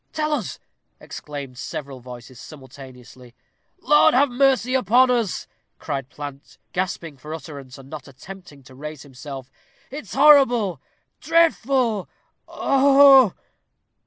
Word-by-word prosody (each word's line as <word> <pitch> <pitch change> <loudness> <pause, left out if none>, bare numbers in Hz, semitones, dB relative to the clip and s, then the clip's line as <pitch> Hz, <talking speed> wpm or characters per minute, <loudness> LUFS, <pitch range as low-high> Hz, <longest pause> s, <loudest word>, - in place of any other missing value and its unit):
Tell 305 -1 -1
us!" 245 -11 -4 0.4
exclaimed 140 -4 -9
several 135 -2 -7
voices 125 0 -12
simultaneously. 130 -4 -14 0.5
"Lord 295 -1 +4
have 280 +2 +3
mercy 255 -1 +1
upon 250 +1 +3
us!" 230 -7 -1 0.3
cried 135 -4 -5
Plant, 145 -1 -10 0.2
gasping 175 -5 -4
for 150 +4 -8
utterance, 140 -5 -11
and 135 -1 -14
not 150 -1 -10
attempting 145 +1 -13
to 130 - -17
raise 150 +2 -9
himself. 135 -1 -10 0.4
"It's 280 -6 -8
horrible! 245 - +4 0.4
dreadful! 270 - +1 0.4
oh! - - -16 0.7
oh!" 185 - -12
155 Hz, 115 wpm, -22 LUFS, -, 0.7 s, Lord